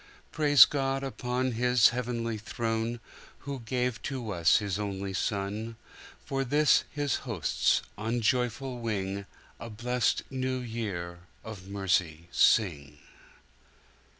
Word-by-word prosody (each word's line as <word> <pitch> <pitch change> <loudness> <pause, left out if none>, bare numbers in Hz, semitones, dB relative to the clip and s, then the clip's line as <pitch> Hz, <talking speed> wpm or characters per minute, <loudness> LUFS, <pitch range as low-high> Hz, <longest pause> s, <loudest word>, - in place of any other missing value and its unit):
Praise 145 -2 +7
God 135 -1 -1
upon 130 -1 -2
His 125 0 +4
heavenly 115 -2 -3
throne, 115 +2 -2 0.4
Who 140 -1 -5
gave 125 0 -2
to 125 -5 -4
us 85 -3 +4
His 100 -2 -2
only 100 -1 -3
Son:For 110 +7 -4
this 145 +3 +3
His 145 -2 -1
hosts, 105 - 0 0.2
on 115 +3 -1
joyful 125 +1 0
wing,A 100 +1 -5
blest 120 +3 0
New 130 -1 -1
Year 105 -8 -4 0.2
of 100 -4 -9
mercy 90 -4 -1
sing. 75 -9 +2
115 Hz, 105 wpm, -29 LUFS, 100-125 Hz, 0.4 s, Praise